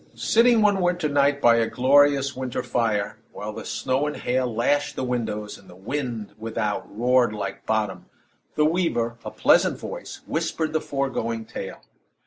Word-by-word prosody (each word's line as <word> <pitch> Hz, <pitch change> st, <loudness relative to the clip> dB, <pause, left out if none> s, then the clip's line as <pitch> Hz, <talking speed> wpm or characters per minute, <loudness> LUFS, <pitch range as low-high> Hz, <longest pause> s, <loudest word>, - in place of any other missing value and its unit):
Sitting 230 Hz, -1 st, +4 dB
one 200 Hz, -2 st, +3 dB
winter 175 Hz, -2 st, +1 dB
night 140 Hz, -1 st, +2 dB
by 120 Hz, -3 st, +5 dB
a 115 Hz, -1 st, +2 dB
glorious 140 Hz, +1 st, +4 dB
winter 130 Hz, -2 st, -3 dB
fire, 105 Hz, -4 st, -1 dB
while -, -, -6 dB
the -, -, -7 dB
snow 135 Hz, +3 st, -1 dB
and 150 Hz, -, -4 dB
hail 125 Hz, 0 st, 0 dB
lashed 145 Hz, +6 st, 0 dB
the -, -, -3 dB
windows, 110 Hz, -4 st, -3 dB
and -, -, -19 dB
the 90 Hz, -, -13 dB
wind 115 Hz, +2 st, -4 dB
without 110 Hz, -2 st, -2 dB
roared 125 Hz, -1 st, +3 dB
like 105 Hz, -, -5 dB
Bottom, 110 Hz, -3 st, -1 dB, 0.5 s
the 150 Hz, -, +3 dB
weaver, 150 Hz, -9 st, 0 dB
a -, -, -5 dB
pleasant -, -, +3 dB
voice -, -, -8 dB
whispered 160 Hz, -1 st, -2 dB
the 155 Hz, -, +1 dB
foregoing 120 Hz, -5 st, -2 dB
tale. -, -, -7 dB
130 Hz, 160 wpm, -24 LUFS, 115-145 Hz, 0.5 s, by